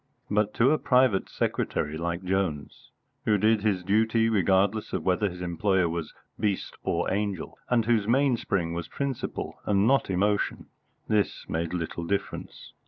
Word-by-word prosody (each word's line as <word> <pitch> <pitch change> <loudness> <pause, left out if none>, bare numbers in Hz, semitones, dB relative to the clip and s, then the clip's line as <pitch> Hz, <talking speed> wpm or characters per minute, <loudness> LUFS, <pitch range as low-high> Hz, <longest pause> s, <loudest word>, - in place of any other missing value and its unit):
But 105 0 +1
to 125 +4 +4
a 155 - +2
private 125 -6 +3
secretary 75 +1 -1
like 85 +2 -3
Jones, 90 -6 -2 0.4
who 105 - +3
did 110 +1 +3
his 100 -4 0
duty 110 +3 +2
regardless 100 +1 +2
of - - -1
whether 95 +3 +2
his 90 0 -9
employer 90 +1 +1
was 80 -2 -4 0.3
beast 100 -3 -1
or - - -1
angel, 100 -3 -3
and 115 -3 +2
whose 110 -3 +2
mainspring 115 -9 +1
was 85 0 -4
principle 140 -3 -4
and 100 0 +2
not 135 -1 +3
emotion, 100 +2 0 0.4
this 105 -2 0
made 85 +2 -2
little 85 0 -4
difference. 100 +4 -4
100 Hz, 150 wpm, -27 LUFS, 90-110 Hz, 0.4 s, to